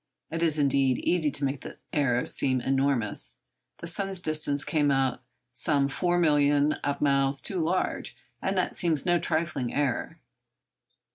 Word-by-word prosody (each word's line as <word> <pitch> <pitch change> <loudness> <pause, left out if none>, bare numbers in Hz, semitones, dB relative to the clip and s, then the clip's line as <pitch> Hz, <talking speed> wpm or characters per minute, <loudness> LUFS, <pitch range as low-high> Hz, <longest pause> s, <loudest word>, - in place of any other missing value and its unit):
It 165 +1 -3
is, 160 -2 +2
indeed, 135 -3 +2
easy 170 -4 +1
to 140 0 0
make 135 0 -3
the - - -9 0.2
error 125 -4 +1
seem 130 -2 +1
enormous. 135 -4 0 0.5
The - - -5
sun's 195 +2 -2
distance 155 -4 +1
came 150 -2 +1
out 135 -2 +1 0.3
some 140 +3 +1
four 175 +5 0
millions 145 -2 +3
of 145 0 -2
miles 140 -1 +2
too 190 - -2
large, 170 +3 -1 0.2
and 190 0 -1
that 185 - 0
seems 160 -5 0
no 175 -1 +3
trifling 155 -8 -1
error. 140 -4 -1
145 Hz, 150 wpm, -27 LUFS, 135-165 Hz, 0.5 s, millions